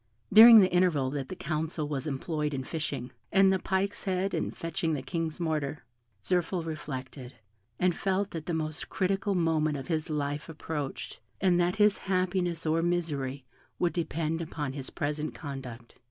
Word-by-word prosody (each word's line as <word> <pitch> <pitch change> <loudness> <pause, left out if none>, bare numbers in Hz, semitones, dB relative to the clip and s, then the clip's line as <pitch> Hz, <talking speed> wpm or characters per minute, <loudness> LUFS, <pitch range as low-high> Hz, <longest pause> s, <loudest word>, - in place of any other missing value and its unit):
During 225 +2 +11
the 185 - +3
interval 165 -8 +3
that 135 -2 -4
the - - -5
council 155 0 -2
was 145 0 -3
employed 150 +1 -2
in 130 - -3
fishing, 140 -5 -4 0.2
and 195 -1 +5
the 190 - +1
pike's 190 +3 -1
head 190 0 0
in 165 - -1
fetching 165 0 -2
the 135 - -4
King's 165 +3 -3
mortar, 155 -3 -2 0.4
Zirphil 180 -1 0
reflected, 135 -4 -6 0.4
and 180 -1 +2
felt 195 +1 0
that 160 -2 -6
the 175 - -1
most 155 0 -3
critical 195 +1 0
moment 155 -3 +1
of 135 - -8
his 160 0 -1
life 145 0 -2
approached, 150 -3 -5 0.2
and 180 -2 +3
that 175 +1 +2
his 210 -1 +4
happiness 185 -3 -1
or 160 +1 +2
misery 145 -6 -1 0.3
would 175 -1 +1
depend 165 -1 -1
upon 150 -4 -4
his 135 -2 -6
present 150 +1 -3
conduct. 130 -5 -8
160 Hz, 165 wpm, -29 LUFS, 145-180 Hz, 0.4 s, During